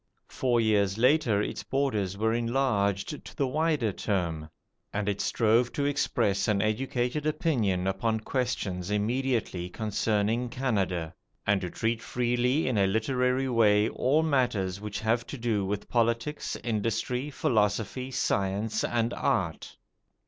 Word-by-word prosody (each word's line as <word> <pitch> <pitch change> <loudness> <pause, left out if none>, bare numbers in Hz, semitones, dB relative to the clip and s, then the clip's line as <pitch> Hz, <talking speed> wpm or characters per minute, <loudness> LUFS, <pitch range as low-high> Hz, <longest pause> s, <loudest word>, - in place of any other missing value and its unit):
Four 125 -2 +1
years 105 -3 +2
later 120 -4 +3
its - - -4
borders 110 -9 -1
were 110 +2 +1
enlarged 115 -1 0
to - - -12
the 140 - +1
wider 150 -4 +1
term, 85 -6 -2 0.4
and 105 0 -2
it 100 -1 0
strove 115 +2 +2
to 140 - -1
express 135 -8 +1
an 105 -2 +2
educated 125 +6 -1
opinion 115 - 0
upon 110 +4 0
questions 105 -8 -2
immediately 110 -4 -1
concerning 110 +3 0
Canada, 95 -10 -1 0.3
and 100 -1 +2
to 90 - -3
treat 115 +5 -1
freely 125 +5 0
in 120 -5 +1
a 100 - +4
literary 125 +5 +1
way 110 -3 +4
all 145 +5 +2
matters 110 - 0
which 105 -1 -5
have 115 +2 0
to 140 - -6
do 115 -4 0
with 100 +1 -3
politics, 115 +4 0
industry, 115 +4 -1
philosophy, 110 0 0
science, 110 -3 0
and 120 0 0
art. - - -1
115 Hz, 135 wpm, -28 LUFS, 100-125 Hz, 0.4 s, a